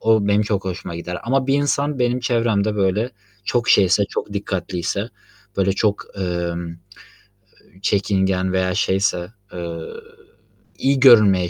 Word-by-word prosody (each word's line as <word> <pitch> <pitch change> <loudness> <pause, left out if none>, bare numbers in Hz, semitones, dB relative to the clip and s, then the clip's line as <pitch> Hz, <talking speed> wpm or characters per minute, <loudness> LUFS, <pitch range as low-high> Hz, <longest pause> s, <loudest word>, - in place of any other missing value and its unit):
O 110 -2 +3
benim 105 +1 +3
çok 100 -2 -1
hoşuma 90 -2 -5
gider 90 +1 -5
ama 130 +2 +1
bir 135 - +2
insan 145 0 0
benim 125 +1 +1
çevremde 115 -4 +1
böyle, 100 +5 +1 0.3
çok 120 +3 0
şeyse, 100 +1 +5
çok - - -4
dikkatliyse, 95 +1 -3 0.5
böyle, 95 0 +2
çok, 105 +1 0
emm, 85 -2 -3
eee, 85 - -9 1.1
çekingen 95 -2 +1
veya 95 0 0
şeyse, 95 0 0 0.2
eee, 85 -2 -5 1.0
iyi 135 0 +1
görünmeye 105 -9 +6
100 Hz, 130 wpm, -21 LUFS, 90-115 Hz, 1.1 s, görünmeye